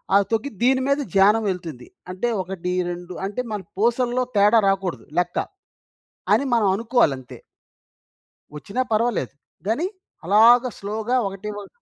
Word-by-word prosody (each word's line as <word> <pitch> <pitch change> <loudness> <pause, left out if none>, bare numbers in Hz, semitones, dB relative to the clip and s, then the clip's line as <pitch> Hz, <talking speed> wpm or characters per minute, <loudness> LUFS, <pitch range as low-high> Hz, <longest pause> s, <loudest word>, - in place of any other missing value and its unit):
అవి 200 -1 +5
తగ్గి 225 +5 0
దీని 260 +1 +3
మీద 280 +1 +2 0.2
ధ్యానం 210 +3 +5
వెళ్తుంది. 165 -9 -6 0.2
అంటే 205 +6 -2
1, 180 -1 -5 0.2
2 175 +1 -7
అంటే 210 +5 -3
మన 205 - -3 0.2
పూసల్లో 240 +3 +1
తేడా 210 +3 +5
రాకూడదు 195 -2 -1
లెక్క 175 0 -2 1.0
అని 280 - +1
మనం 215 -4 +3
అనుకోవాలంతె. 220 - 0 1.2
వచ్చినా 200 +11 -3
పర్వాలేదు 215 - 0 0.3
గాని 295 +12 0 0.4
అలాగా 235 +6 +6
స్లో‌గా 220 +5 -2
ఒకటి 195 +2 -6
ఒకటి. 200 - -10
210 Hz, 125 wpm, -22 LUFS, 185-240 Hz, 1.2 s, అలాగా